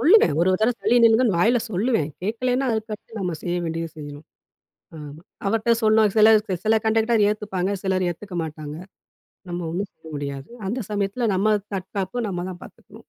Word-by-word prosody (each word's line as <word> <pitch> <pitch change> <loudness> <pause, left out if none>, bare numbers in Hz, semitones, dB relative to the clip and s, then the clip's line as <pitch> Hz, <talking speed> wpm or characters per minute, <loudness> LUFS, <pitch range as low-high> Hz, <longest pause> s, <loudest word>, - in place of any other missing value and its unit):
சொல்லுவேன் 330 - +6
ஒரு 175 - +3
ஒரு 185 - +1
தரவை 240 +2 +3
தள்ளி 245 - +3
நில்லுங்கன்னு 225 -3 +4
வாயில 235 +6 +4
சொல்லுவேன். 205 - +1
கேக்கலன்னா, 250 +6 0
அதுக்கடுத்து 220 0 -5
நம்ம 180 -4 -2
செய்ய 175 0 -1
வேண்டியது 165 0 -4
செய்யணும் 145 0 -9 0.7
ஆமா. 150 0 -9 0.3
அவர்ட்ட 225 +2 0
சொன்னா 220 0 +5
சில 215 0 +7 0.4
சில 220 +1 +4
கண்டெக்டர் 225 +1 +2
அத 210 - +4
ஏத்துப்பாங்க. 205 -3 -2
சிலர் 190 -1 +1
ஏத்துக்க 180 +2 -7
மாட்டாங்க. 150 -1 -7 0.7
நம்ம 175 0 -3
ஒண்ணும் 190 +3 -3
செய்ய 160 - -17
முடியாது 140 -1 -5 0.2
அந்த 235 +7 -2
சமயத்தில, 205 +3 -1
நம்ம 210 +3 +3 0.2
தற்காப்பு 195 +5 -3
நம்ம 175 -2 -3
தான் 175 - -11
பாத்துக்கணும். - - -16
200 Hz, 165 wpm, -23 LUFS, 175-225 Hz, 0.7 s, சில